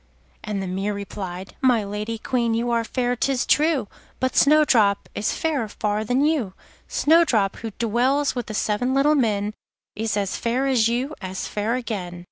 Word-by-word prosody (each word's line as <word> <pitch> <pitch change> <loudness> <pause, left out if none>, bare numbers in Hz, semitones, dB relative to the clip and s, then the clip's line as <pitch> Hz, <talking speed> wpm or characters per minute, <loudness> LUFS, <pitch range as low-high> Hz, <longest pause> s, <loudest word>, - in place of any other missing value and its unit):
and 205 -2 -3
the - - -4
mirror 195 +3 -2
replied: 190 -2 -7
'My 250 -5 +3
Lady 210 +3 -4
Queen, 235 0 0
you 235 +1 -1
are 230 -1 +1
fair, 245 +1 -1
'tis 260 +1 0
true, 300 -6 +2 0.3
But 260 0 -1
Snowdrop 265 -9 +4
is 210 - -1
fairer 295 -8 -1
far 210 0 -2
than 250 +6 +1
you. 275 -12 0 0.3
Snowdrop, 290 - +3
who 225 - -5
dwells 250 +5 +1
with 245 -3 -4
the 215 - -5
seven 245 +6 0
little 285 +3 +4
men, 215 -6 +1 0.4
Is 220 0 -1
as 200 -2 -1
fair 245 +3 0
as 250 -5 +3
you, 245 +5 -1
as 185 -1 -4
fair 215 +3 -1
again. 195 -8 -4
230 Hz, 170 wpm, -23 LUFS, 205-260 Hz, 0.4 s, Snowdrop